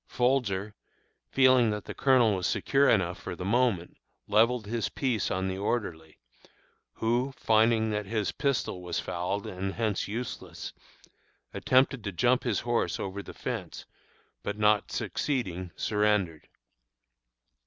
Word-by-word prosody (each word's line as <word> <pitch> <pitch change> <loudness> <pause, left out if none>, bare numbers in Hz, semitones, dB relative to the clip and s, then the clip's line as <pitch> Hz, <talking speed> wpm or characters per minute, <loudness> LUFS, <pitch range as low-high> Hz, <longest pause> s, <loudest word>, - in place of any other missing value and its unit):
Folger, 115 -6 0 0.6
feeling 130 -3 +5
that 105 -1 -3
the - - -6
Colonel 125 -5 +4
was 90 - -1
secure 140 +1 +2
enough 90 -4 +2
for 90 +1 -6
the 90 - -6
moment, 105 -5 +1 0.3
levelled 110 +2 +3
his 115 +1 -2
piece 125 -6 -1
on 95 +1 -1
the 95 0 -3
orderly, 90 -8 -3 0.8
who, 120 +4 0
finding 110 0 +3
that 105 -1 -2
his 105 -1 -1
pistol 135 -9 -1
was 90 -2 -3
fouled 90 +4 -3
and 95 +1 -4
hence 110 -4 -1
useless, 115 +4 -6 0.8
attempted 130 -2 +2
to 100 - -3
jump 120 +7 +2
his 115 -5 0
horse 120 -1 0
over 100 +1 -4
the - - -11
fence, - - -5 0.6
but 105 - -4
not 105 -1 +3
succeeding, 95 - -2
surrendered. 105 -6 0
105 Hz, 130 wpm, -28 LUFS, 95-120 Hz, 0.8 s, feeling